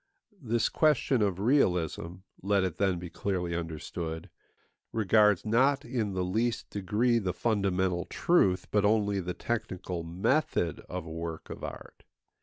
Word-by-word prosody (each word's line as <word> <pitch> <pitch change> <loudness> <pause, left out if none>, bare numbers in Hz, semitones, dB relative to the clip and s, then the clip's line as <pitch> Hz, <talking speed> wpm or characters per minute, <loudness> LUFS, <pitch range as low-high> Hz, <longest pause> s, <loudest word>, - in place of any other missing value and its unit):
This 120 -3 +1
question 140 -5 +2
of 100 -4 +1
realism, 90 - +1 0.2
let 100 0 +2
it 95 -4 -2
then 95 -2 +2
be 85 -1 -7
clearly 90 -2 -2
understood, 80 0 -5 0.6
regards 105 -2 +3
not 135 +6 +3
in 115 -5 -2
the 90 - 0
least 110 +6 -1
degree 110 +5 +1
the 95 -4 -2
fundamental 95 -4 0
truth, 95 - +2
but 105 -1 +3
only 105 -1 +2
the 90 -1 -4
technical 95 -6 -3
method, 90 - 0
of 90 -2 -5
a 80 - -8
work 80 0 -6
of - - -8
art. - - -8
95 Hz, 140 wpm, -29 LUFS, 90-115 Hz, 0.6 s, regards